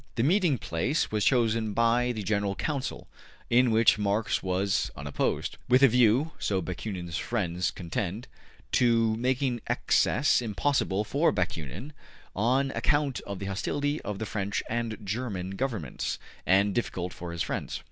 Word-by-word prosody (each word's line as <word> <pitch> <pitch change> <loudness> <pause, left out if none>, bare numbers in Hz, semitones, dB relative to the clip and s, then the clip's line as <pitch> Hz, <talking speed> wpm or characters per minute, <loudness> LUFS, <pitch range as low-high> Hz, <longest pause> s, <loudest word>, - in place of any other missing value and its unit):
The 115 - +1
meeting 170 -2 +3
place 110 - -1
was 105 -1 0
chosen 115 -4 +2
by 115 +2 +2
the 110 -3 -4
General 100 0 0
Council 140 +1 -3 0.4
(in 125 +1 +5
which 110 -1 +4
Marx 105 +1 0
was 95 -5 0
unopposed), 70 0 -2
with 125 +2 +5
a - - +10
view 125 +5 +3
so 95 -2 0
Bakunin's 90 -2 -4
friends 90 - -1
contend 90 - -4 0.4
to 115 -2 +3
making 125 0 0
access 140 +2 +2
impossible 110 -2 0
for 140 +9 +2
Bakunin 90 - -4 0.4
(on 130 +6 +2
account 145 -3 0
of 100 -1 -4
the 100 - -5
hostility 145 +10 -1
of 105 - -4
the 110 - -3
French 100 -1 -2
and 115 -1 -2
German 100 -3 -3
governments) 105 - -3 0.3
and 100 +2 +4
difficult 90 -6 -2
for 85 -1 -7
his 85 -1 -2
friends. - - -3
110 Hz, 145 wpm, -28 LUFS, 95-125 Hz, 0.4 s, a